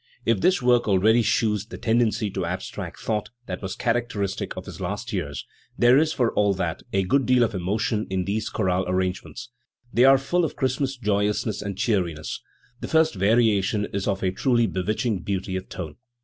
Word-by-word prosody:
If 115 -4 +2
this 185 -8 +3
work 120 -1 +3
already 110 +4 +4
she 115 - +2
yvs 105 0 -1
the - - -7
tendency 110 -2 +1
to 95 - -3
abstract 90 +2 -5
thought 105 -2 -2 0.2
that 90 -3 -5
was 95 -1 -4
characteristic 115 -5 -2
of - - -6
his - - -9
last - - -4
years, 70 0 -3 0.3
there 120 +1 +6
is, 155 +3 +3
for 120 -6 0
all 100 -1 +2
that, 90 -3 -2
a 95 0 +1
good 130 +8 +1
deal 125 -1 +5
of 115 - 0
emotion 105 +4 -1
in 95 -1 -1
these 105 +2 -2
chorale 95 -3 0
arrangements. 95 +6 -3 0.4
They 120 +3 +5
are 135 0 +7
full 175 +7 0
of 160 - -2
Christmas 130 +1 -1
joyousness 105 -1 0
and 100 -2 -5
cheeriness. 90 -8 -1 0.4
The - - -5
first 160 -2 +3
variation 105 0 +2
is 100 -1 -2
of 100 -1 -1
a 95 - +2
truly 120 +4 +2
bewitching 105 +2 -1
beauty 95 +1 -3
of 95 0 -5
tone. 80 -5 -7
105 Hz, 190 wpm, -24 LUFS, 95-120 Hz, 0.4 s, are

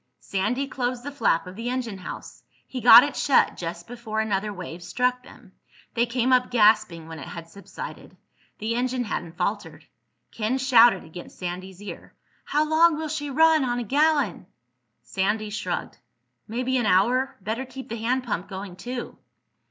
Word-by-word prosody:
Sandy 215 +8 -1
closed 250 -2 -3
the 285 - -5
flap 275 -12 +1
of 180 +1 -9
the 230 +3 -4
engine 240 -6 -3
house. 180 - -9 0.2
He 255 - -6
got 235 +1 +10
it 285 -1 -3
shut 275 - +3
just 170 0 -6
before 230 -1 -5
another 210 -1 -1
wave 180 -3 -8
struck 250 +8 0
them. - - -16 0.4
They 235 0 +1
came 250 +1 +1
up 250 0 +3
gasping 215 -7 +3
when 160 -1 -8
it 135 - -8
had 170 -1 -8
subsided. 200 +4 -10 0.4
The 220 +2 -2
engine 250 +1 -1
hadn't 175 -6 -5
faltered. - - -3 0.5
Ken 230 +4 -1
shouted 240 -6 +5
against 170 +2 -11
Sandy's 185 +2 -6
ear. 205 - -9 0.3
"How 300 +1 +1
long 320 +1 +4
will 315 0 -4
she 290 -1 -3
run 315 +1 +4
on 245 -1 -1
a 245 - -2
gallon?" 285 - +1 0.6
Sandy 210 - -1
shrugged. 210 - -4 0.5
"Maybe 250 +3 -1
an 240 -4 +1
hour. 255 +8 +2
Better 220 +6 -3
keep 265 0 -9
the 230 - -5
hand 245 +4 0
pump 200 -7 -3
going 190 -2 -7
too." 245 +6 -6
235 Hz, 165 wpm, -25 LUFS, 195-255 Hz, 0.6 s, got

